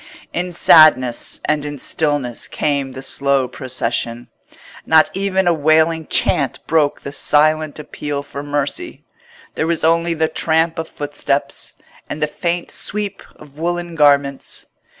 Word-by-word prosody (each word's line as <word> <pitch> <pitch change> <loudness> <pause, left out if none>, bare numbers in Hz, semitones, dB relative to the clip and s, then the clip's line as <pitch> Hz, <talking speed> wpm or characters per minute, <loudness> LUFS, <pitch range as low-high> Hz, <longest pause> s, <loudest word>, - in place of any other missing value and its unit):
In 180 +1 -2
sadness 155 -8 +5
and 150 -1 0
in 145 0 -5
stillness 145 -4 -1
came 140 -3 -1
the 130 - -8
slow 140 -1 +1
procession. 120 -2 -3 0.5
Not 160 -1 +4
even 190 -1 0
a 175 - +5
wailing 160 +1 +2
chant 140 -5 +1
broke 155 -2 +1
the 140 - -7
silent 155 +1 +2
appeal 145 -1 -5
for 140 0 -7
mercy: 145 -1 -3 0.5
there 160 - -1
was 170 -1 -1
only 165 +1 +2
the 160 0 +1
tramp 160 +1 0
of 160 - -4
footsteps, 145 -1 -3 0.3
and 150 - -5
the 150 - +2
faint 170 +3 -3
sweep 205 -1 -4
of 150 0 -16
woollen 175 +1 -2
garments. 140 -3 +1
150 Hz, 135 wpm, -18 LUFS, 140-165 Hz, 0.5 s, sadness